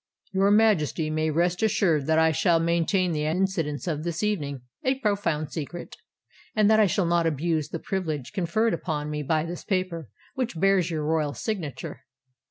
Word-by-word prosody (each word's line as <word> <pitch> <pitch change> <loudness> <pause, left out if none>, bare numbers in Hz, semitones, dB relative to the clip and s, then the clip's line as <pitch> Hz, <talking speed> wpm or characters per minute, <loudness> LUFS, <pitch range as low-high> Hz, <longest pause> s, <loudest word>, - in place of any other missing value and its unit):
"Your 195 +1 +3
Majesty 190 -8 +3
may 155 0 0
rest 175 +4 +1
assured 175 -9 +2
that 160 0 +3
I 160 0 +4
shall 165 +2 +3
maintain 170 +2 +1
the 150 -2 -1
incidents 165 -3 -1
of 155 -4 -2
this 170 +2 -3
evening 145 -11 -1 0.2
a 260 +1 +2
profound 200 - -1
secret, 170 +2 -6 0.6
and 215 -1 +4
that 220 - +5
I 215 - +5
shall 185 +1 +1
not 170 -1 +2
abuse 155 0 -1
the - - -3
privilege 155 -9 -3
conferred 210 +5 +1
upon 150 -3 -3
me 150 0 -2
by 155 +2 0
this 175 +1 -6
paper 185 - -2 0.2
which 245 -10 -3
bears 195 -2 +3
your 155 -3 -2
royal 155 -2 0
signature." 160 - -4
170 Hz, 175 wpm, -26 LUFS, 155-195 Hz, 0.6 s, that